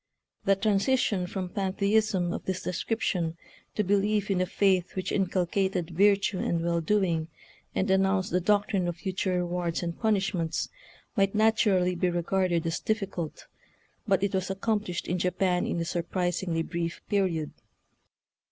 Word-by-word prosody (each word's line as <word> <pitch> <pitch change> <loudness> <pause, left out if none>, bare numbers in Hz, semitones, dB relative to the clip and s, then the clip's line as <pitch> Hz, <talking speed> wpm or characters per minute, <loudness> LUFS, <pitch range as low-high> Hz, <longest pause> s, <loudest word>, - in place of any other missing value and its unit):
The 195 -1 +5
transition 200 -1 +1
from 185 -1 -4
pantheism 195 -1 +1
of - - -5
this 185 0 -2
description 180 -4 -1 0.4
to 210 - +1
belief 205 +1 +1
in 185 -2 +2
a 185 - +1
faith 185 -2 +1
which 185 -1 -2
inculcated 185 -1 0
virtue 200 +2 +3
and 170 -1 0
well 170 -1 +1
doing, 170 -3 +1 0.5
and 190 - +1
announced 190 0 +2
the 180 - +2
doctrine 200 -1 +2
of 175 -1 -3
fu 190 +2 -3
ture 185 0 -1
rewards 175 -1 -1
and 170 -1 -3
punishments, 195 -7 0 0.5
might 195 +1 +2
naturally 210 -4 +3
be 180 +1 +1
regarded 175 0 0
as 165 +1 -1
difficult, 195 -7 -3 0.6
but 195 -1 +2
it 200 - 0
was 190 -1 -1
accomplished 195 -2 -1
in 180 +1 -1
Japan 180 0 +1
in - - -1
a 165 - -1
surpris 175 +2 -1
ingly 165 -3 -1
brief 170 0 -3
period. 180 -7 0
185 Hz, 150 wpm, -28 LUFS, 175-200 Hz, 0.6 s, The